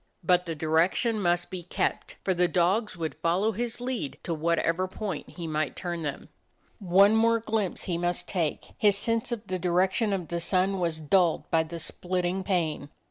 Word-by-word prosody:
But 180 +1 +3
the 165 - -3
direction 170 +9 +2
must 175 0 +1
be 185 -1 -4
kept, 175 - -2
for 190 - +1
the 180 0 +3
dogs 185 +4 +1
would 160 -2 -3
follow 185 +6 +2
his 235 +3 -2
lead 245 - -3
to 170 - -2
whatever 170 +3 +1
point 190 -4 -5
he 175 - -7
might 155 -2 -1
turn 175 -2 -4
them. 145 -3 -5 0.5
One 200 +2 +5
more 230 +1 +4
glimpse 215 -4 -2
he 170 -2 -2
must 175 0 -1
take. 170 -6 -2
His 205 -2 +4
sense 230 +3 -1
of 230 -2 -4
the 185 -1 -3
direction 185 +5 +2
of 185 -4 -2
the 170 - -2
sun 190 +2 +1
was 170 -3 -1
dulled 165 +2 +2
by 165 - +4
the 160 +1 -6
splitting 180 +2 -2
pain. 160 -6 -1
180 Hz, 185 wpm, -27 LUFS, 170-200 Hz, 0.5 s, One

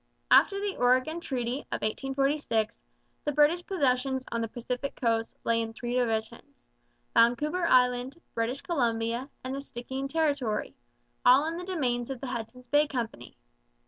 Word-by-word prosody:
After 395 -1 +6
the 405 -1 -2
Oregon 255 +7 +2
Treaty 255 -5 -2
of - - -3
1846 270 -1 0 0.4
the 295 - 0
British 300 +4 +3
possessions 265 -7 0
on 235 - -1
the 225 - -1
Pacific 250 +4 -4
coast 230 -2 0
lay 230 0 +2
in 225 0 -4
three 240 +1 -4
divisions, 235 +3 -2 0.5
Vancouver 295 +10 +3
Island, 250 +3 +3
British 235 +4 -1
Columbia, 235 -4 -1
and 255 +1 -4
the 275 - -3
Stikeen 265 +1 -5
Territory, 280 -8 0 0.5
all 260 +4 +6
in 325 +1 -2
the 355 - -5
domains 255 -10 -1
of 265 -2 -4
the 270 - -6
Hudson's 250 0 -6
Bay 290 +4 +3
Company. 230 - -5
255 Hz, 145 wpm, -29 LUFS, 235-290 Hz, 0.5 s, After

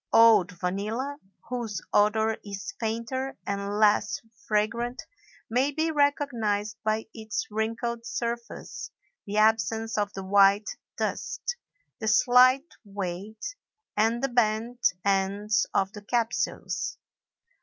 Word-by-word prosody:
Old 215 -5 +6
vanilla, 215 +11 -3 0.3
whose 235 -4 -3
odor 220 +2 +3
is 200 -1 -6
fainter 230 +4 -2
and 200 +1 -2
less 210 0 +3 0.3
fragrant, 230 +4 0 0.4
may 250 +5 +2
be 320 +2 0
recognized 235 -8 +1
by 215 0 0
its 220 -2 -3
wrinkled 230 +2 -2
surface, 235 0 -4 0.4
the 205 +1 -2
absence 220 0 +2
of 205 0 0
the 195 - -5
white 200 +2 +4 0.3
dust, 485 - -2 0.4
the 220 - -3
slight 255 +6 +5
weight, 200 - -5 0.4
and 225 +4 +2
the 275 - +2
bent 240 0 +2 0.2
ends 200 +2 +1
of 195 0 +1
the 210 - -8
capsules. 230 +2 -1
220 Hz, 110 wpm, -27 LUFS, 205-240 Hz, 0.4 s, Old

